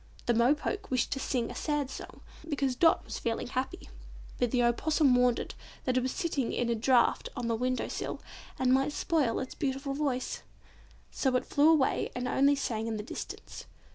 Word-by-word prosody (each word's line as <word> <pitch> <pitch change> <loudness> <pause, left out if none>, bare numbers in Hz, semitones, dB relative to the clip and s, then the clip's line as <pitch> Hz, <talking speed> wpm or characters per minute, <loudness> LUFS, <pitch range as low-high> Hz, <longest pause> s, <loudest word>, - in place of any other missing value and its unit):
The 240 - +3
Mo 235 +5 +4
poke 410 +7 -4
wished 255 -2 0
to 270 - -1
sing 245 -3 -1
a - - -9
sad 295 -3 -1
song - - -9 0.3
because 275 -4 0
Dot 325 +5 +4
was - - -5
feeling 230 -1 -2
happy, 260 +9 -4 0.5
but 245 - +2
the 245 +1 +2
Opossum 275 +3 +3
warned 245 -1 +4
it - - -5 0.3
that 255 - +1
it 255 - +3
was 255 +1 -1
sitting 285 -7 -1
in 240 - -1
a - - +3
draught 240 +2 +3
on 245 - -3
the 230 - +1
window 255 +2 -1
sill - - -4 0.4
and 255 -1 +3
might 270 +3 +2
spoil 295 -11 +1
its 260 - -5
beautiful 275 0 -2
voice, 275 -3 -2 0.7
so 265 -2 0
it 255 - +1
flew 295 +2 +4
away 305 -5 +3
and 250 0 -2
only 280 +3 +4
sang 230 -5 -2
in 225 -1 -2
the 210 - -4
distance. - - -7
260 Hz, 200 wpm, -30 LUFS, 245-285 Hz, 0.7 s, Mo